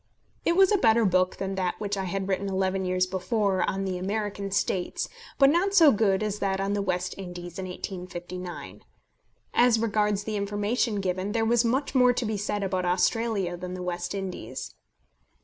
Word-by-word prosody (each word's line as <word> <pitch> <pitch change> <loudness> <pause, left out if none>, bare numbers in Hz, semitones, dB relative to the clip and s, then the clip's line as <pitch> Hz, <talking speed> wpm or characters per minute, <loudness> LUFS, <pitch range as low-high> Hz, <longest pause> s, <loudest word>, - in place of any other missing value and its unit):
It 340 - +3
was 385 +1 +5
a 410 - +3
better 225 -1 +4
book 185 -1 +2
than 195 0 -3
that 185 -2 -2
which 205 -1 -2
I 195 -1 -3
had 195 +1 -3
written 195 +1 -1
eleven 190 0 0
years 185 0 +1
before 190 +1 0
on 195 0 -2
the 185 -1 -2
American 200 +1 -3
States, 190 -2 -1 0.3
but 275 0 +6
not 385 +5 +1
so 320 -6 +8
good 205 -3 +2
as 210 -1 -2
that 195 -1 0
on 195 +1 0
the 205 - 0
West 185 -2 -1
Indies 175 -1 -7
in 190 - -3
1859. 180 -1 -7 0.7
As 240 -1 +5
regards 210 -2 +1
the 215 0 -3
information 205 +2 0
given, 185 +2 -2
there 225 -1 +1
was 235 +1 +3
much 260 +5 0
more 250 -2 +5
to 245 0 -2
be 215 0 -1
said 205 0 -2
about 185 -1 -1
Australia 190 +1 +1
than 180 +1 -6
the 180 - -5
West 175 +1 -3
Indies. 180 - -5
195 Hz, 185 wpm, -27 LUFS, 185-220 Hz, 0.7 s, so